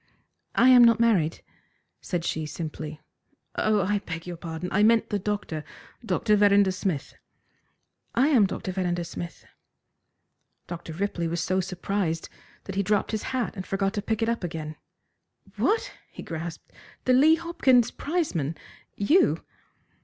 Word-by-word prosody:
"I 250 Hz, +3 st, +6 dB
am 250 Hz, -1 st, +9 dB
not 230 Hz, -1 st, +6 dB
married," 195 Hz, -9 st, +2 dB, 0.6 s
said 175 Hz, -2 st, -3 dB
she 155 Hz, -1 st, -2 dB
simply. 155 Hz, -1 st, -6 dB, 0.6 s
"Oh, 215 Hz, -2 st, +2 dB
I 205 Hz, +2 st, +1 dB
beg 165 Hz, -3 st, -7 dB
your 175 Hz, -1 st, -5 dB
pardon! 165 Hz, +1 st, -5 dB
I 205 Hz, -, +2 dB
meant 225 Hz, +1 st, +4 dB
the 205 Hz, -, 0 dB
doctor 200 Hz, -6 st, -3 dB, 0.4 s
Dr. 220 Hz, -1 st, +2 dB
Verrinder 200 Hz, -1 st, +5 dB
Smith." 185 Hz, -6 st, -3 dB, 1.0 s
"I 265 Hz, +5 st, +4 dB
am 235 Hz, -10 st, +5 dB
Dr. 190 Hz, 0 st, -4 dB
Verrinder 180 Hz, -2 st, -1 dB
Smith." 170 Hz, 0 st, -7 dB, 1.2 s
Dr. 170 Hz, -2 st, -7 dB
Ripley 175 Hz, -1 st, -2 dB
was 170 Hz, +1 st, -2 dB
so 185 Hz, +3 st, 0 dB
surprised 185 Hz, -2 st, -2 dB, 0.3 s
that 195 Hz, -, -6 dB
he 195 Hz, -, +1 dB
dropped 205 Hz, +1 st, +1 dB
his 215 Hz, -1 st, -1 dB
hat 255 Hz, -4 st, -2 dB
and 190 Hz, -, -5 dB
forgot 195 Hz, 0 st, 0 dB
to 205 Hz, -, -2 dB
pick 220 Hz, +2 st, -1 dB
it -, -, +1 dB
up 235 Hz, -4 st, -1 dB
again. 155 Hz, -2 st, -5 dB, 0.8 s
"What!" 445 Hz, +1 st, +1 dB, 0.2 s
he -, -, -10 dB
grasped, 160 Hz, 0 st, -7 dB, 0.3 s
"the 255 Hz, -, +4 dB
Lee 300 Hz, +5 st, +6 dB
Hopkins 275 Hz, -8 st, +3 dB
prizeman! 185 Hz, -, -2 dB, 0.4 s
You!" 305 Hz, -, +3 dB
195 Hz, 145 wpm, -26 LUFS, 170-225 Hz, 1.2 s, am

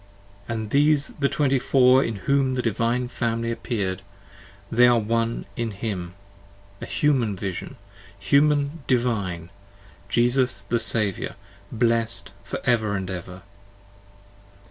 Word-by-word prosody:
45 115 Hz, -, -3 dB
And 105 Hz, -, -7 dB
these 145 Hz, 0 st, +3 dB
the 140 Hz, -1 st, +2 dB
Twenty 135 Hz, -3 st, +2 dB
four 130 Hz, +1 st, +5 dB
in 115 Hz, -, -3 dB
whom 135 Hz, -2 st, +2 dB
the 125 Hz, -, -1 dB
Divine 120 Hz, +2 st, 0 dB
Family 115 Hz, -1 st, -2 dB
Appear'd; 100 Hz, -6 st, -3 dB, 0.7 s
and 115 Hz, -, -3 dB
they 125 Hz, 0 st, +8 dB
were 120 Hz, -, +4 dB
One 115 Hz, +1 st, -1 dB
in 115 Hz, -1 st, -2 dB
Him. 95 Hz, -4 st, -5 dB, 0.7 s
A -, -, -5 dB
Human 130 Hz, -9 st, +1 dB
Vision! 95 Hz, -1 st, -5 dB, 0.4 s
Human 145 Hz, +2 st, +2 dB
Divine, 100 Hz, -9 st, -1 dB, 0.6 s
Jesus 120 Hz, -2 st, +2 dB
the 115 Hz, +4 st, 0 dB
Saviour, 105 Hz, -4 st, -1 dB, 0.4 s
blessed 115 Hz, -1 st, 0 dB
for -, -, -5 dB
ever 110 Hz, -4 st, +1 dB
and 95 Hz, -1 st, -3 dB
ever. 90 Hz, 0 st, -7 dB
115 Hz, 125 wpm, -24 LUFS, 105-130 Hz, 0.7 s, they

